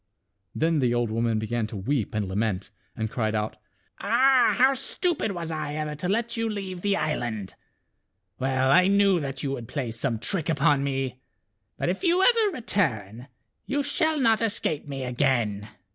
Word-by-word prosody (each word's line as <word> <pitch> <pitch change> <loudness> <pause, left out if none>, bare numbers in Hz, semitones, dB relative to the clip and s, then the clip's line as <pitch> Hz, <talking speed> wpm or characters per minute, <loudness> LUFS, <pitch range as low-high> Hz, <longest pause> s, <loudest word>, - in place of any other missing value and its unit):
Then 160 0 +1
the 120 -3 +2
old 120 -2 0
woman 115 0 0
began 110 +1 -2
to 105 - -7
weep 110 +2 -2
and 105 -2 -1
lament, 100 0 -2 0.2
and 110 -1 -2
cried 110 -3 -1
out, 105 0 -2 0.2
" - - -36
Ah! 260 +2 +4
how 260 +2 +5
stupid 275 - -1
was 170 -2 -4
I 155 -2 -3
ever 155 -1 -3
to 155 +5 -4
let 230 +3 0
you 225 -1 -1
leave 190 -4 -5
the 200 0 +1
island. 120 -10 -2 0.9
Well 130 0 +1
I 180 +3 +6
knew 200 -2 +4
that 135 -3 -5
you 140 - -1
would 120 -4 -5
play 130 -4 -3
some 115 +1 -2
trick 165 - -3
upon 145 -3 +3
me. 135 -2 -2 0.6
But - - -1
if 185 - -3
you 360 +2 +3
ever 450 -2 +4
return, 125 - -1 0.4
you 285 +2 0
shall 315 +1 +1
not 225 -4 +3
escape 205 -10 -1
me 135 -2 -5
again." 120 -5 0
145 Hz, 175 wpm, -26 LUFS, -, 0.9 s, I